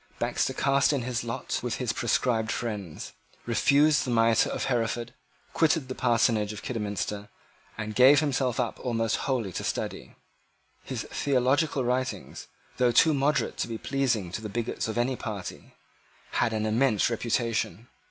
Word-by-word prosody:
Baxter -, -, 0 dB
cast 140 Hz, +1 st, +3 dB
in 135 Hz, -4 st, -1 dB
his 120 Hz, -1 st, -2 dB
lot 115 Hz, -1 st, -3 dB
with 120 Hz, -1 st, -2 dB
his 120 Hz, -4 st, -2 dB
proscribed 115 Hz, -1 st, 0 dB
friends, 105 Hz, -9 st, -5 dB, 0.3 s
refused 145 Hz, +6 st, +3 dB
the 130 Hz, -, -4 dB
mitre 115 Hz, -1 st, +3 dB
of -, -, -3 dB
Hereford, 120 Hz, -2 st, -1 dB, 0.4 s
quitted 160 Hz, -4 st, +2 dB
the -, -, -2 dB
parsonage 115 Hz, -4 st, +2 dB
of 105 Hz, -, -9 dB
Kidderminster, 105 Hz, -2 st, -3 dB, 0.5 s
and 110 Hz, 0 st, -4 dB
gave 130 Hz, +5 st, +7 dB
himself 135 Hz, -5 st, 0 dB
up 120 Hz, -2 st, -2 dB
almost 115 Hz, -3 st, 0 dB
wholly 120 Hz, -7 st, 0 dB
to -, -, -4 dB
study. -, -, -4 dB, 0.7 s
His -, -, -4 dB
theological 140 Hz, +1 st, +1 dB
writings, 125 Hz, +2 st, -3 dB, 0.3 s
though 125 Hz, -1 st, +3 dB
too 160 Hz, +6 st, +5 dB
moderate 140 Hz, -2 st, +1 dB
to -, -, -1 dB
be 115 Hz, -1 st, -4 dB
pleasing 120 Hz, -9 st, -1 dB
to 110 Hz, -, -4 dB
the 110 Hz, -, -5 dB
bigots 115 Hz, +2 st, -3 dB
of 110 Hz, -, -4 dB
any 125 Hz, +2 st, +1 dB
party, 105 Hz, -6 st, -7 dB, 0.6 s
had -, -, +1 dB
an 110 Hz, -1 st, -1 dB
immense 110 Hz, 0 st, +2 dB
reputation. 115 Hz, -3 st, -1 dB
120 Hz, 150 wpm, -27 LUFS, 110-130 Hz, 0.7 s, gave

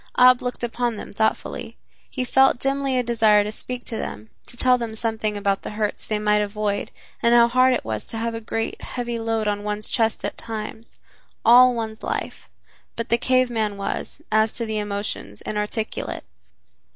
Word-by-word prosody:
Ab 250 Hz, 0 st, +7 dB
looked 250 Hz, -1 st, -4 dB
upon 240 Hz, 0 st, -1 dB
them -, -, -8 dB
thoughtfully. 220 Hz, +1 st, -1 dB, 0.3 s
He 255 Hz, -, -3 dB
felt 265 Hz, +1 st, +4 dB
dimly 275 Hz, 0 st, 0 dB
a 250 Hz, -, +2 dB
desire 220 Hz, -3 st, +4 dB
to 210 Hz, -, -4 dB
speak 245 Hz, +3 st, -5 dB
to 225 Hz, -, -5 dB
them, 110 Hz, -, -6 dB, 0.2 s
to 240 Hz, -, -9 dB
tell 250 Hz, 0 st, +4 dB
them 230 Hz, -2 st, -4 dB
something 220 Hz, -2 st, -2 dB
about 200 Hz, -1 st, 0 dB
the -, -, -6 dB
hurts 210 Hz, -1 st, -3 dB
they 215 Hz, -, 0 dB
might 210 Hz, 0 st, +2 dB
avoid, 205 Hz, 0 st, -2 dB, 0.3 s
and 235 Hz, +1 st, +4 dB
how 235 Hz, 0 st, +7 dB
hard 255 Hz, +2 st, +4 dB
it -, -, -4 dB
was 110 Hz, -1 st, -4 dB
to 225 Hz, -, -6 dB
have 230 Hz, +1 st, -2 dB
a 225 Hz, -, -5 dB
great, 225 Hz, 0 st, -3 dB
heavy 240 Hz, -2 st, -4 dB
load 225 Hz, -1 st, -1 dB
on 205 Hz, 0 st, -1 dB
one's 210 Hz, 0 st, -3 dB
chest 225 Hz, -2 st, +1 dB
at -, -, -4 dB
times 220 Hz, 0 st, -7 dB, 0.5 s
all 250 Hz, +2 st, +8 dB
one's 220 Hz, -1 st, -4 dB
life -, -, -4 dB, 0.5 s
but 230 Hz, -, -4 dB
the 235 Hz, -, +4 dB
cave 255 Hz, -1 st, +2 dB
man 215 Hz, -3 st, -1 dB
was, 200 Hz, -, -4 dB
as 220 Hz, 0 st, +3 dB
to 230 Hz, -, -3 dB
the 220 Hz, -1 st, -2 dB
emotions, 200 Hz, -, -4 dB
inarticulate. 210 Hz, +1 st, -3 dB
225 Hz, 190 wpm, -23 LUFS, 210-240 Hz, 0.5 s, all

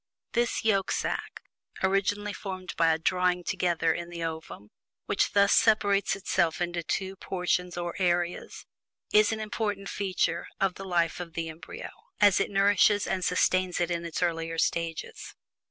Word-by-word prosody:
This 240 Hz, -1 st, 0 dB
yolk 195 Hz, -3 st, +2 dB
sack -, -, -3 dB, 0.4 s
(originally 205 Hz, +2 st, +1 dB
formed 185 Hz, -2 st, -6 dB
by 165 Hz, -1 st, +4 dB
a 160 Hz, -, +2 dB
"drawing 180 Hz, +1 st, +1 dB
together" 175 Hz, -3 st, +1 dB
in 170 Hz, +1 st, -5 dB
the 170 Hz, -1 st, -6 dB
ovum, 160 Hz, -10 st, -6 dB, 0.3 s
which -, -, 0 dB
thus 200 Hz, 0 st, +5 dB
separates 205 Hz, -3 st, +3 dB
itself 175 Hz, -4 st, 0 dB
into 175 Hz, -1 st, -1 dB
two 190 Hz, +3 st, -3 dB
portions 180 Hz, -1 st, -2 dB
or 175 Hz, -1 st, -3 dB
areas) 175 Hz, -1 st, -1 dB, 0.5 s
is 210 Hz, +1 st, +5 dB
an 220 Hz, -, -2 dB
important 210 Hz, -2 st, -3 dB
feature 195 Hz, -2 st, -1 dB
of 195 Hz, -2 st, +2 dB
the 195 Hz, -, -8 dB
life 170 Hz, -2 st, 0 dB
of 170 Hz, -2 st, -7 dB
the 165 Hz, -1 st, -3 dB
embryo, 160 Hz, +1 st, -8 dB, 0.3 s
as 205 Hz, -2 st, +5 dB
it -, -, 0 dB
nourishes 205 Hz, +1 st, +4 dB
and 185 Hz, -1 st, -2 dB
sustains 185 Hz, 0 st, +1 dB
it 175 Hz, 0 st, 0 dB
in 170 Hz, 0 st, -1 dB
its 170 Hz, +1 st, -3 dB
earlier 165 Hz, -1 st, -1 dB
stages. 165 Hz, -1 st, -2 dB
180 Hz, 155 wpm, -28 LUFS, 170-195 Hz, 0.5 s, thus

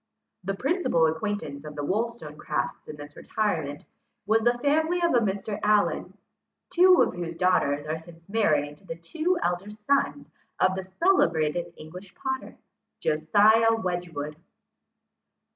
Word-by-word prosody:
The 195 Hz, +2 st, -2 dB
principal 270 Hz, -, +1 dB
acquaintance 160 Hz, -3 st, -3 dB
of 150 Hz, -1 st, -9 dB
the 145 Hz, -, -4 dB
Wollstonecrafts 175 Hz, -, -3 dB
in 150 Hz, -, -7 dB
this 145 Hz, 0 st, -11 dB
retirement, 160 Hz, -10 st, -2 dB, 0.4 s
was 225 Hz, +1 st, +3 dB
the 240 Hz, +2 st, +2 dB
family 315 Hz, +6 st, +1 dB
of 340 Hz, -1 st, +2 dB
a 245 Hz, -, +5 dB
Mr. 205 Hz, -1 st, -2 dB
Allen, 210 Hz, -1 st, +1 dB, 0.5 s
two 365 Hz, 0 st, +6 dB
of -, -, -1 dB
whose 170 Hz, -1 st, -5 dB
daughters 150 Hz, -5 st, +2 dB
are 155 Hz, +1 st, -3 dB
since 165 Hz, 0 st, -16 dB
married 150 Hz, -9 st, +1 dB
to 190 Hz, -, -21 dB
the 165 Hz, -, -5 dB
two 320 Hz, -, -1 dB
elder 180 Hz, +3 st, -1 dB
sons 210 Hz, -, -1 dB, 0.3 s
of 185 Hz, 0 st, +3 dB
the 190 Hz, -1 st, -5 dB
celebrated 170 Hz, -, +2 dB
English 180 Hz, +5 st, -11 dB
potter, 265 Hz, 0 st, -4 dB, 0.4 s
Josiah 210 Hz, +9 st, +4 dB
Wedgwood. 175 Hz, -7 st, -4 dB
185 Hz, 135 wpm, -26 LUFS, 155-225 Hz, 0.5 s, two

